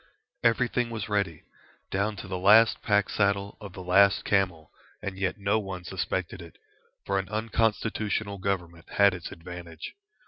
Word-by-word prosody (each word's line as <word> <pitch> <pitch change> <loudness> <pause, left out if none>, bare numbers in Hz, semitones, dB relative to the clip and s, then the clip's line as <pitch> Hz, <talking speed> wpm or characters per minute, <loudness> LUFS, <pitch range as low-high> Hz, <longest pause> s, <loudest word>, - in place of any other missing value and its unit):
Everything 120 0 +2
was 110 -3 -5
ready, 100 -6 -1 0.5
down 100 +2 0
to 95 - -8
the 90 -1 -3
last 110 +4 +6
pack 105 -1 +2
saddle 100 -1 0
of 100 -3 -9
the 95 - -8
last 100 +2 +4
camel, 90 -6 0 0.3
and 100 -2 -5
yet 95 +1 -1
no 100 +2 +1
one 95 -3 -6
suspected 90 0 -3
it, 85 -1 -13 0.5
for 100 0 +1
an 95 -1 -5
unconstitutional 110 -2 -1
Government 90 -3 -3
has 100 -1 +5
its 90 -2 -7
advantage. 85 -1 -9
100 Hz, 150 wpm, -27 LUFS, 90-105 Hz, 0.5 s, last